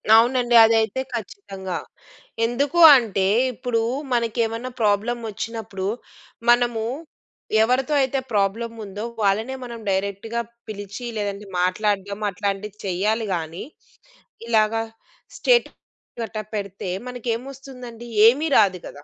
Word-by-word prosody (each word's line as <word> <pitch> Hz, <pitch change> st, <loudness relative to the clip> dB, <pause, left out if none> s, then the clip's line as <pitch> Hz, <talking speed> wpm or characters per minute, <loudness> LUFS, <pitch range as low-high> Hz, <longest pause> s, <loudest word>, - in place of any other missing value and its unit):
అవునండి. 240 Hz, +1 st, +4 dB
అదైతే 225 Hz, +2 st, +2 dB
ఖచ్చితంగా. 195 Hz, -4 st, -5 dB, 0.7 s
ఎందుకు 275 Hz, +7 st, 0 dB, 0.2 s
అంటే, 210 Hz, -6 st, +1 dB, 0.3 s
ఇప్పుడు 245 Hz, -1 st, -1 dB, 0.3 s
మనకేమన్నా 230 Hz, +1 st, -1 dB
ప్రాబ్లమ్ 220 Hz, +3 st, +1 dB
వచ్చినప్పుడు 215 Hz, -3 st, -5 dB, 0.6 s
మనము 240 Hz, -2 st, +3 dB, 0.8 s
ఎవరితో 255 Hz, +5 st, +1 dB
అయితే 270 Hz, +1 st, 0 dB
ప్రాబ్లమ్ 215 Hz, +3 st, 0 dB
ఉందో 205 Hz, +2 st, -6 dB, 0.2 s
వాళ్ళనే 220 Hz, +6 st, +1 dB
మనం 235 Hz, -1 st, -7 dB
డైరెక్ట్‌గా 200 Hz, +4 st, -2 dB, 0.3 s
పిలిచి 205 Hz, +3 st, -7 dB
లేదంటే 205 Hz, 0 st, -3 dB, 0.2 s
మాట్లాడడం, 200 Hz, +2 st, 0 dB
అట్లాంటివి 200 Hz, +2 st, -4 dB
చేయాలి 210 Hz, +5 st, 0 dB
గానీ, 165 Hz, +1 st, -5 dB, 0.8 s
ఇలాగ 220 Hz, -1 st, +3 dB, 0.6 s
స్టేటస్ 480 Hz, -, -1 dB
అట్ట 220 Hz, -, -8 dB, 0.2 s
పెట్టితే 200 Hz, -2 st, -4 dB, 0.2 s
మనకేమొస్తుందండి? 250 Hz, 0 st, -6 dB, 0.2 s
ఏమీ 280 Hz, +7 st, +3 dB
రాదు 185 Hz, -2 st, +4 dB
కదా! 145 Hz, -, -12 dB
225 Hz, 100 wpm, -23 LUFS, 200-240 Hz, 0.8 s, అవునండి